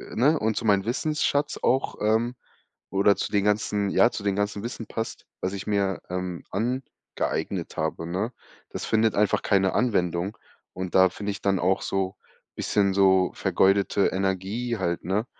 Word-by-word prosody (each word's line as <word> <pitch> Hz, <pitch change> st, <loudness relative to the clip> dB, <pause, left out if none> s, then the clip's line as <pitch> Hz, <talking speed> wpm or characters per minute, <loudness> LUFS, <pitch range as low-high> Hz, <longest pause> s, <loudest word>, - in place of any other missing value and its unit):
ne, 145 Hz, +6 st, +3 dB
und 110 Hz, 0 st, 0 dB
zu 115 Hz, -, -2 dB
mein 100 Hz, -2 st, +3 dB
Wissensschatz 145 Hz, +3 st, 0 dB
auch, 130 Hz, +1 st, +1 dB
ähm, 110 Hz, +3 st, +1 dB, 0.6 s
oder 100 Hz, +1 st, +4 dB
zu -, -, -3 dB
den 100 Hz, -2 st, +2 dB
ganzen 105 Hz, -1 st, +1 dB
ja, 120 Hz, -, +5 dB
zu 105 Hz, -, -6 dB
den 100 Hz, -1 st, 0 dB
ganzen 105 Hz, 0 st, -1 dB
Wissen 115 Hz, -1 st, -5 dB
passt, 115 Hz, +2 st, -5 dB
was 95 Hz, -, -2 dB
ich 100 Hz, -, -6 dB
mir, 100 Hz, -2 st, 0 dB
ähm, 90 Hz, -1 st, -4 dB
angeeignet 120 Hz, +6 st, -3 dB
habe, 80 Hz, +1 st, -2 dB
ne? 95 Hz, +8 st, -2 dB, 0.4 s
Das -, -, -5 dB
findet 110 Hz, 0 st, +2 dB
einfach 105 Hz, 0 st, +2 dB
keine 95 Hz, -1 st, +2 dB
Anwendung 90 Hz, -4 st, 0 dB, 0.4 s
und 95 Hz, -1 st, -5 dB
da 95 Hz, 0 st, +7 dB
finde 100 Hz, +2 st, -4 dB
ich -, -, -8 dB
dann 100 Hz, -1 st, +1 dB
auch 95 Hz, +2 st, +2 dB
so 95 Hz, 0 st, -2 dB, 0.4 s
bisschen 100 Hz, -2 st, +1 dB
so 95 Hz, -1 st, +4 dB
vergeudete 100 Hz, +1 st, +2 dB
Energie 95 Hz, +5 st, -1 dB
halt, 85 Hz, 0 st, -2 dB
ne? 100 Hz, +6 st, 0 dB
100 Hz, 165 wpm, -26 LUFS, 95-110 Hz, 0.6 s, da